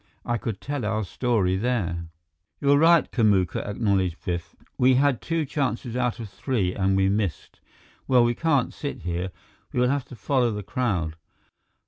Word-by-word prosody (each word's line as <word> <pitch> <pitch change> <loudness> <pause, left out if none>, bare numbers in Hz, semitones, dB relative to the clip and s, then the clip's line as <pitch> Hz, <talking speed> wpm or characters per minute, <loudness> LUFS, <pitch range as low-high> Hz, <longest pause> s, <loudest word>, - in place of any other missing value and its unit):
I 120 -1 0
could 110 -4 -4
tell 145 -3 -4
our 110 +1 0
story 100 -2 0
there." 95 -7 -1 0.5
"You're 140 0 +4
right, 165 +1 +5
Kamuka," 100 -7 +2
acknowledged 100 -4 0
Biff. 85 -1 -3 0.2
"We 130 +1 +4
had 140 -1 +2
two 165 -2 -1
chances 130 -4 -2
out 125 -2 0
of 115 - -5
three 100 -3 -1
and 95 -1 +1
we 95 0 +3
missed. 100 -3 -2 0.5
Well, 125 -2 +5
we 120 0 +2
can't 145 -1 +1
sit 145 - -5
here. 90 +1 -2 0.4
We - - -1
will 125 0 +3
have 140 -1 0
to 125 - -11
follow 125 0 +1
the 105 -2 -4
crowd." 90 -8 -1
115 Hz, 165 wpm, -25 LUFS, 95-130 Hz, 0.5 s, right